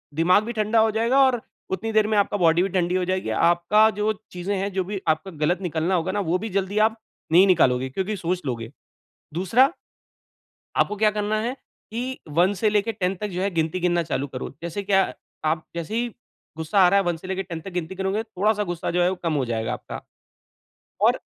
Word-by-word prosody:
दिमाग 180 +6 +4
भी 230 - -4
ठंडा 215 0 +2
हो 220 0 +4
जाएगा 230 +5 +2
और 250 -3 +1 0.3
उतनी 190 +4 -2
देर 215 -1 +3
में 215 -1 +1
आपका 205 0 +2
बॉडी 170 -1 +4
भी 195 - -1
ठंडी 180 -1 0
हो 185 -1 +1
जाएगी। 185 -6 -1
आपका 175 - +4
जो 210 +1 +2 0.2
चीज़ें 180 +3 -3
हैं 195 +1 -2
जो 190 0 0
भी 195 +1 -5
आपका 160 +5 0
गलत 175 +4 +1
निकलना 175 +1 0
होगा 165 -2 0
ना 205 - -1
वो 180 - +3
भी 220 +3 -4
जल्दी 195 +1 -2
आप 225 0 -8 0.3
नहीं 180 +4 +7
निकालोगे 130 -8 +3
क्योंकि 190 +9 -2
सोच 180 +1 -2
लोगे। 115 -3 -4 0.6
दूसरा 225 - +3 1.1
आपको 210 - +2
क्या 215 +1 +3
करना 210 0 -1
है 240 +3 -2 0.4
कि 250 +3 -4 0.2
1 180 +4 +4
से 215 - +4
लेके 210 +2 +1
10 195 -3 -1
तक 210 - -1
जो 180 -1 -3
है 195 - +1
गिनती 165 +2 0
गिनना 175 -1 +1
चालू 145 -3 -2
करो। 130 -1 -6
जैसे 170 +4 -4
क्या 195 -1 +2 0.3
आप 155 +1 0
जैसे 170 +5 -4
ही 240 +1 0 0.5
गुस्सा 160 +5 0
आ 185 - +7
रहा 200 +2 +4
है 195 - -1
1 175 -1 0
से 175 - -11
लेके 190 0 -2
10 170 -3 -6
तक 195 - -8
गिनती 180 0 -4
गिनोगे। 190 +3 -1
थोड़ा-सा 210 0 0
गुस्सा 175 -3 -3
जो 175 +1 +2
है 175 - +3
वो 190 - -2
कम 165 -2 0
हो 140 -3 0
जाएगा 115 -2 -2
आपका। - - -7 1.0
और - - +3
190 Hz, 220 wpm, -24 LUFS, 170-210 Hz, 1.1 s, नहीं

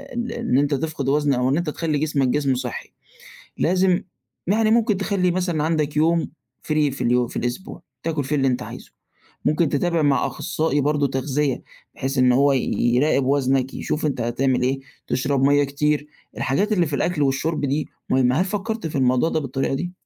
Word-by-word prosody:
ال 240 0 -3
إن 235 - 0
أنت 145 +1 +2
تفقد 140 -1 -2
وزن 145 0 +2
أو 125 0 +1
إن 140 - +2
أنت 170 -2 -1
تخلّي 155 0 -1
جسمَك 150 -3 +1
جسم 135 0 +1
صحّي، 125 -1 -5 0.6
لازم 185 +1 +2 0.4
يعني 215 +3 +2
ممكن 220 -3 +3
تخلي 195 -2 +1
مثلًا 175 -4 -1
عندك 155 -2 0
يوم 165 +2 +2 0.4
free 155 - 0 0.2
في 135 - -7
اليو 125 0 +2
في - - -7
الأسبوع، 120 +9 -4 0.2
تاكل 160 -3 -1
فيه 140 +3 -1
اللي 135 -2 +2
أنت 125 -1 0
عايزُه، - - -10 0.5
ممكن 155 0 +2
تتابع 165 +3 +1
مع 145 -2 +2
أخصائي 155 -2 -1
برضه 145 0 +1
تغذية، 135 +1 -1 0.3
بحيث 135 +1 -3
إن 125 -1 +5
هو 140 +3 +4
ي 135 - +2 0.4
يراقب 135 0 +2
وزنك 135 -1 +1
يشوف 155 - -2
أنت 140 -5 -1
هتعمل 125 +3 0
إيه، 135 +2 0 0.3
تشرب 135 +1 0
مَيَّة 145 +1 +4
كتير، 150 +1 0 0.3
الحاجات 195 +11 0
اللي 180 -4 +2
في 150 -2 -2
الأكل 170 +1 -1
والشُرب 140 +4 0
دي 140 +2 -1 0.2
مهمة، 130 +3 +3
هل - - +1
فكّرت 215 0 -3
في 150 - -4
الموضوع 130 +3 +2
ده 160 - 0
بالطريقة 135 -2 -2
دي؟ 175 +6 -3
145 Hz, 185 wpm, -22 LUFS, 135-165 Hz, 0.6 s, إن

